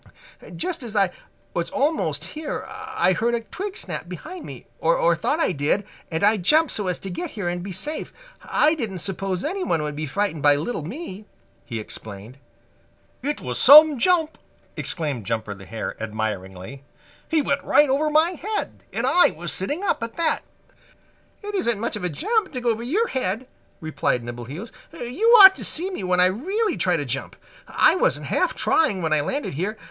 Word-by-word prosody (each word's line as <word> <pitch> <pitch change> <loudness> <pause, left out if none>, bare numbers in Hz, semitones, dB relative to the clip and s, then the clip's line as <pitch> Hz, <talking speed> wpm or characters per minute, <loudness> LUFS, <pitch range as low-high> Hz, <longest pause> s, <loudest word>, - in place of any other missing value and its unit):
"Just 355 -2 -2
as 230 -3 -7
I 195 -3 +3 0.4
was 170 -1 -2
almost 295 - 0
here 305 0 -5
I 185 - -1
heard 235 +7 0
a 235 - -2
twig 390 - -6
snap - - -4
behind 365 -2 -8
me, - - -10
or - - +3
thought 305 - -1
I 325 - +2
did, 160 +6 0 0.2
and 160 +1 -2
I 210 +2 +5
jumped 300 - +3
so 205 -3 -1
as 180 - -1
to 195 - -5
get 340 - -4
here 200 -4 -2
and 175 0 -2
be 195 +2 -6
safe. 300 - -4 0.3
I 305 +1 +2
didn't 225 - -4
suppose 185 +1 -2
anyone 320 - -1
would 150 -1 -4
be 155 +1 -4
frightened 180 0 -2
by 145 0 +5
little 160 +7 -3
me," 210 - -7 0.4
he 115 -4 -5
explained. 110 +3 -8 0.8
"It 290 +3 -2
was 125 -1 -2
some 300 0 +9
jump!" 325 +1 +2 0.4
exclaimed 145 - -3
Jumper 110 -2 -2
the 95 -1 -13
Hare 115 0 -5
admiringly. 105 +2 -5 0.5
"He 315 -2 +2
went 280 +1 -1
right 295 - +4
over 285 +3 +1
my 315 +3 +4
head, 415 +5 -4
and - - -2
I 355 - +5
was 170 +2 -3
sitting 290 - -2
up 390 - 0
at 230 0 -5
that!" 335 -2 +2 1.0
"It 415 0 -5
isn't 235 - 0
much 230 - -1
of 210 - -6
a 180 - 0
jump 420 - 0
to 250 - -4
go 240 -1 +2
over 225 0 -3
your 370 - 0
head," 245 -1 -2 0.3
replied 155 -6 -1
Nimbleheels. 120 - -7 0.2
"You 250 - -2 0.2
ought 385 0 +10
to - - -7
see 365 +5 -1
me 360 - -5
when 180 0 +1
I 180 - +7
really 365 - 0
try 180 -2 +1
to 145 - -3
jump. 135 +2 -4 0.3
I - - +4
wasn't - - +1
half - - 0
trying 205 - +1
when 160 -1 +1
I 155 - +3
landed 270 - -3
here. 195 +9 -3
210 Hz, 190 wpm, -23 LUFS, -, 1.0 s, ought